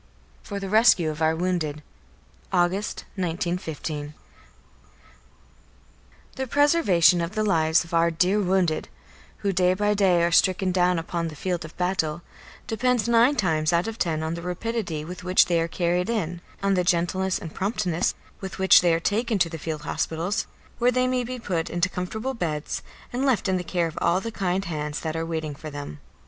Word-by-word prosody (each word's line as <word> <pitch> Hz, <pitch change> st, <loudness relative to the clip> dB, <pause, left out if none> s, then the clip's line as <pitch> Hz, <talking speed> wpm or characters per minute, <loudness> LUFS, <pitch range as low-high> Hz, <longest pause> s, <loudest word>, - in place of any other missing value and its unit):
XVII -, -, -17 dB
FOR 200 Hz, -1 st, -3 dB
THE 195 Hz, -1 st, -5 dB
RESCUE 200 Hz, -7 st, +5 dB
OF 155 Hz, +1 st, -8 dB
OUR 160 Hz, 0 st, +3 dB
WOUNDED 160 Hz, -4 st, -2 dB, 0.7 s
August, 185 Hz, +3 st, 0 dB, 0.2 s
1915. 165 Hz, -4 st, -3 dB, 2.2 s
The 265 Hz, 0 st, -2 dB
preservation 240 Hz, -, +4 dB
of 170 Hz, +5 st, -4 dB
the 215 Hz, -, +1 dB
lives 160 Hz, -5 st, +3 dB
of 170 Hz, -, -14 dB
our 165 Hz, 0 st, +4 dB
dear 180 Hz, +5 st, +2 dB
wounded, 180 Hz, -4 st, +1 dB, 0.6 s
who 200 Hz, -, +2 dB
day 180 Hz, 0 st, +3 dB
by 205 Hz, +2 st, +1 dB
day 185 Hz, -4 st, +3 dB
are 170 Hz, -, +2 dB
stricken 185 Hz, +2 st, +3 dB
down 180 Hz, -1 st, +2 dB
upon 170 Hz, 0 st, -2 dB
the 155 Hz, -, -7 dB
field 175 Hz, +2 st, -2 dB
of 155 Hz, -, -11 dB
battle, 175 Hz, -3 st, -1 dB, 0.4 s
depends 240 Hz, +1 st, 0 dB
nine 235 Hz, +4 st, +4 dB
times 155 Hz, -, +1 dB
out 170 Hz, +2 st, +2 dB
of 225 Hz, 0 st, -6 dB
ten 160 Hz, -3 st, 0 dB
on 160 Hz, +1 st, -2 dB
the 170 Hz, -, -5 dB
rapidity 180 Hz, -3 st, -3 dB
with 180 Hz, +3 st, -8 dB
which 185 Hz, +1 st, +5 dB
they 170 Hz, -2 st, +1 dB
are 165 Hz, -, 0 dB
carried 175 Hz, +3 st, 0 dB
in; 175 Hz, -7 st, -2 dB, 0.2 s
on 195 Hz, 0 st, +3 dB
the 180 Hz, -1 st, +2 dB
gentleness 180 Hz, +2 st, +1 dB
and 160 Hz, -, -8 dB
promptness 190 Hz, -4 st, -1 dB, 0.2 s
with 190 Hz, -1 st, -7 dB
which 190 Hz, -1 st, +6 dB
they 170 Hz, -2 st, +3 dB
are -, -, 0 dB
taken 220 Hz, +5 st, 0 dB
to 175 Hz, -3 st, +2 dB
the 165 Hz, -1 st, -7 dB
field 155 Hz, -1 st, -4 dB
hospitals, 170 Hz, +6 st, -2 dB, 0.3 s
where 245 Hz, +1 st, +4 dB
they 255 Hz, +1 st, +2 dB
may 255 Hz, -1 st, 0 dB
be 250 Hz, +1 st, -5 dB
put 180 Hz, -8 st, -2 dB
into 175 Hz, +2 st, 0 dB
comfortable 220 Hz, +9 st, -4 dB
beds 155 Hz, -, -3 dB, 0.3 s
and 250 Hz, +2 st, -1 dB
left 260 Hz, -7 st, +2 dB
in 190 Hz, -1 st, +1 dB
the 180 Hz, -, -3 dB
care 175 Hz, 0 st, 0 dB
of 165 Hz, 0 st, -5 dB
all 175 Hz, -, +3 dB
the 230 Hz, +3 st, -5 dB
kind 190 Hz, -2 st, -1 dB
hands 150 Hz, -3 st, -3 dB
that 160 Hz, -1 st, -3 dB
are 165 Hz, 0 st, -2 dB
waiting 160 Hz, -2 st, -3 dB
for 155 Hz, +2 st, -8 dB
them. 145 Hz, -, -7 dB
180 Hz, 185 wpm, -25 LUFS, 165-200 Hz, 2.2 s, which